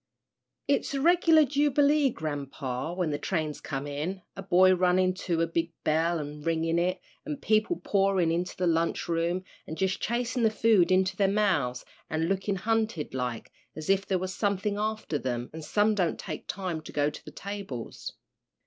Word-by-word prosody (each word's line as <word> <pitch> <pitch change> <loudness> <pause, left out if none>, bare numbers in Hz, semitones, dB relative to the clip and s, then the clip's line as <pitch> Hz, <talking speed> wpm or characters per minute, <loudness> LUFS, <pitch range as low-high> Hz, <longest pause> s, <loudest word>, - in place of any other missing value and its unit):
"It's 280 0 +1
a - - 0
reg'lar 325 0 +5
jubilee, 290 +1 +3
grampa, 145 - -4
when 180 -4 0
the 145 - -2
trains 155 -3 -2
come 135 0 -4
in 155 +7 -4
a 195 - -6
boy 185 0 +5
runnin' 185 0 +3 0.2
to 165 -1 +2
a - - +3
big 165 0 -2
bell 165 +2 +1
an' 150 0 -6
ringin' 165 +1 0
it, 180 +2 0 0.2
an' 300 -1 -4
people 220 +7 +1
pourin' 195 -4 +2
into 175 +2 -2
the 180 - 0
lunch 165 0 +1
room, 170 +2 0 0.2
an' 160 - -5
jus' 190 +2 0
chasin' 245 +2 -1
the 225 - +5
food 215 -5 +3
into 185 0 +3
their 195 0 +2
mouths 185 -12 +1 0.2
an' 160 0 -1
lookin' 195 +2 0
hunted 220 -4 -1
like, 125 -3 -3 0.2
as 155 +4 -1
if 195 0 +1
there 190 - +1
was 185 +1 -4
somethin' 205 0 -1
after 215 -8 -2
them, 120 -1 -3
an' 160 - -7
some 205 +7 +2
don't 180 -5 0
take - - -6
time 180 -5 -3
to - - -10
go 145 0 +1
to - - -11
the - - -9
tables. 195 - -6
185 Hz, 180 wpm, -28 LUFS, 160-210 Hz, 0.2 s, reg'lar